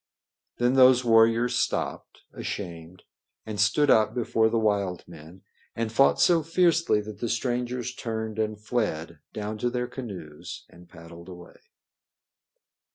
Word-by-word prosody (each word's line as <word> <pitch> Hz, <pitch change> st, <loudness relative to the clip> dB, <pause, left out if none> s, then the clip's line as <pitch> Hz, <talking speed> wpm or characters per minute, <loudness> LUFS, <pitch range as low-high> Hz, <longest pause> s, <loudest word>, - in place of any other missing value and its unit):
Then 120 Hz, +1 st, +2 dB
those 130 Hz, -1 st, +5 dB
warriors 115 Hz, +1 st, +4 dB
stopped, -, -, -3 dB
ashamed, 85 Hz, -2 st, -7 dB, 0.4 s
and 110 Hz, -2 st, -6 dB
stood 120 Hz, +8 st, +3 dB
up 110 Hz, +1 st, +3 dB
before 110 Hz, -2 st, +1 dB
the 115 Hz, -, 0 dB
wild 100 Hz, -5 st, -1 dB
men 85 Hz, +2 st, -14 dB, 0.3 s
and 115 Hz, -1 st, -2 dB
fought 135 Hz, +4 st, +3 dB
so 170 Hz, -2 st, +4 dB
fiercely 165 Hz, -6 st, +2 dB
that 105 Hz, -1 st, -10 dB
the 120 Hz, -, -3 dB
strangers 125 Hz, +1 st, -2 dB
turned 110 Hz, -3 st, -5 dB
and 110 Hz, -1 st, -2 dB
fled 95 Hz, -8 st, -3 dB
down 105 Hz, 0 st, -5 dB
to 120 Hz, -, 0 dB
their 125 Hz, 0 st, -2 dB
canoes 95 Hz, -, -9 dB
and 85 Hz, 0 st, -17 dB
paddled 85 Hz, +1 st, -13 dB
away. 90 Hz, -1 st, -13 dB
110 Hz, 135 wpm, -26 LUFS, 95-125 Hz, 0.4 s, those